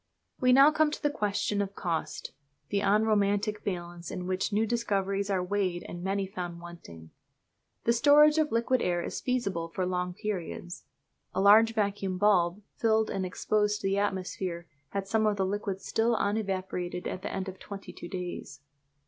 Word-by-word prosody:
We 255 0 +4
now 275 +4 +8
come 310 0 +3
to 300 - -6
the 290 - +2
question 205 -4 0
of 200 0 -4
cost 170 -3 -3 0.4
the 200 - +1
unromantic 210 0 +2
balance 175 -2 -5
in 180 - -5
which 185 +3 -1
new 215 +2 +2
discoveries 200 -3 -1
are 190 -2 +1
weighed 185 -2 -1
and 175 - -7
many 195 +1 -1
found 180 -3 -6
wanting. 85 - -11 0.7
The 235 - +3
storage 300 +5 +6
of 305 -1 +1
liquid 235 +2 +2
air 175 -1 0
is - - -4
feasible 200 -10 -1
for 185 +2 -2
long 180 0 -2
periods. 185 -4 -5 0.5
(A - - +1
large 220 +3 +6
vacuum 200 -3 -1
bulb 195 -1 +3
filled 220 -1 +2
and 190 -1 -2
exposed 210 +3 0
to - - -1
the 195 +1 +1
atmosphere 185 -3 -2 0.2
had 200 -1 -3
some 220 +1 +2
of 210 -1 +1
the 190 - +1
liquid 195 0 -3
still 230 +1 +1
unevaporated 190 -4 -2
at 185 - -4
the - - -4
end 190 0 -3
of 190 0 -7
twenty 200 -1 -9
two - - -9
days.) 175 -6 -6
200 Hz, 175 wpm, -29 LUFS, 180-215 Hz, 0.7 s, now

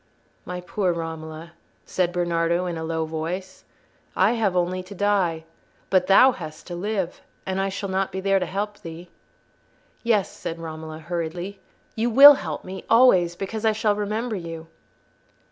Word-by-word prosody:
"My 180 0 -5
poor 185 +1 -1
Romola," 165 0 -6 0.3
said 180 -2 0
Bernardo, 170 0 0
in 175 -1 -3
a 160 - -5
low 160 0 -2
voice, 170 +4 -5 0.5
"I 190 +4 +4
have 220 -6 0
only 180 +1 0
to 185 +2 -11
die, 190 -5 +1 0.5
but 185 -1 +3
thou 255 +7 +7
hast 155 -10 -9
to 175 - -6
live—and 190 0 -4
I 195 - 0
shall 200 +1 -4
not 190 0 -1
be 190 - -4
there 195 0 +2
to 180 - -2
help 205 +3 -4
thee." 170 -1 -9 0.9
"Yes," 220 -4 +2
said 165 - -6
Romola, 160 -1 -7
hurriedly, 175 +4 -5 0.4
"you 230 +2 0
will 275 +5 +10
help 160 - -5
me—always—because 190 0 +2
I 220 -1 +3
shall 215 -1 +1
remember 215 +3 -2
you." 165 -3 -7
185 Hz, 150 wpm, -24 LUFS, 165-200 Hz, 0.9 s, will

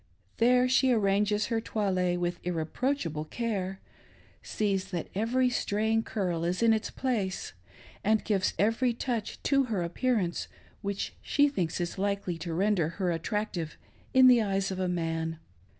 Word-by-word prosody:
There 250 +2 +4
she 260 0 +4
arranges 210 -1 +2
her 225 -2 0
toilet 185 -5 0
with 175 0 -2
irre 170 -3 -2
proachable 165 - -2
care, 195 -5 -2 0.6
sees 200 -3 -1
that 175 -4 -4
every 250 +5 +1
straying 220 0 +1
curl 180 -7 -2
is 180 +5 0
in 225 -1 +6
its 220 0 -1
place, 215 -8 -2 0.5
and 215 +1 +2
gives 195 -3 +1
every 230 +4 +2
touch 235 -2 -3
to 275 -1 +3
her 210 -7 -1
appearance 185 0 0 0.3
which 200 -1 -3
she 290 0 +3
thinks 180 - -2
is 175 +2 -3
likely 200 -4 -1
to 165 +1 -4
render 180 -2 +1
her 185 -3 +1
attractive 170 -1 -3 0.3
in 260 0 +6
the 250 -2 +7
eyes 195 -2 0
of 190 - -4
a 185 - 0
man. 165 -2 -2
200 Hz, 150 wpm, -29 LUFS, 175-230 Hz, 0.6 s, the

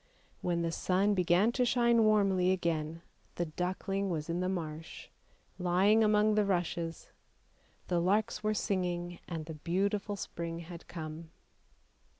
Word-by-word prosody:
When 170 -1 0
the 165 - 0
sun 190 +4 +1
began 180 +3 +3
to 250 +1 +1
shine 235 -1 +4
warmly 195 -4 +3
again, 165 -3 -1 0.3
the 175 - -1
duckling 190 +4 -2
was 160 -1 -2
in 170 - -1
the 185 0 0
marsh, 160 -3 -5 0.5
lying 190 +5 +4
among 215 0 +4
the 210 0 +3
rushes; 175 -3 -2 0.8
the 175 -1 +1
larks 205 +6 +1
were 215 0 0
singing 175 -3 -2
and 165 -3 -5
the 160 - -6
beautiful 200 +6 -1
spring 170 -3 -5
had 170 0 -10
come. 160 0 -7
180 Hz, 140 wpm, -32 LUFS, 170-205 Hz, 0.8 s, shine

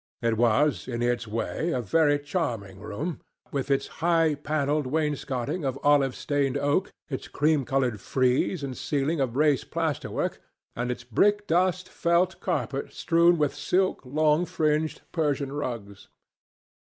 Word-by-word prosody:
It 115 -1 +2
was, 120 +6 +2
in 120 -2 -2
its 120 -1 0
way, 115 +9 -2
a 130 - 0
very 145 - +3
charming 120 - -3
room, 140 - -5 0.3
with 140 -1 -2
its 135 -1 +2 0.2
high 165 -2 +3
panelled 145 -1 -1
wainscoting 145 0 -1
of 135 -1 -1
olive 140 -3 +4
stained 140 -3 0
oak, 145 +6 +1 0.2
its 135 -4 -5
cream 150 -2 +1
coloured 125 -6 0
frieze 130 - +1
and 130 -2 -4
ceiling 145 +4 -1
of 130 -3 -1
raised 145 -1 +2
plasterwork, 160 -3 -2 0.4
and 120 +1 -2
its 125 0 -4
brickdust 185 - +2
felt 175 +2 +1
carpet 140 -6 -2
strewn 170 +1 +3
with 150 -2 +1
silk, 180 +6 0
long 155 +5 +2
fringed 155 0 0
Persian 145 -4 -1
rugs. 115 -8 -5
145 Hz, 140 wpm, -26 LUFS, 125-160 Hz, 0.4 s, olive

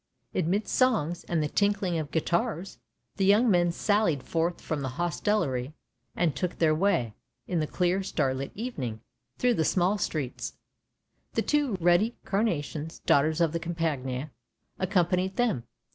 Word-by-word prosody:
Amidst 200 +6 0
songs 210 - +2
and 165 -3 0
the - - 0
tinkling 195 -1 +1
of 150 -2 -4
guitars, 170 +3 -1 0.4
the 195 - +2
young 210 +4 +5
men 175 -2 +3
sallied 185 -7 +1
forth 170 +3 -1
from 155 -3 -3
the 135 - -2
hostelry, 160 -6 0 0.4
and 165 -5 +1
took 180 -1 -2
their 160 -2 +3
way, 155 - +1 0.3
in 175 - -1
the 155 - 0
clear 180 +4 +1
starlit 135 -7 -1
evening, 135 - -4 0.4
through 250 -1 +3
the 160 - +1
small 185 +5 +2
streets; 145 -8 -3 0.8
the - - +1
two 290 -7 +1
ruddy 175 +7 +3
carnations, 165 -6 -1
daughters 155 +3 +3
of 165 -2 +3
the 170 - -2
Campagna, 150 -5 -2 0.5
accom 185 -2 +2
panied 185 +2 0
them. 220 - 0
170 Hz, 145 wpm, -28 LUFS, 150-200 Hz, 0.8 s, young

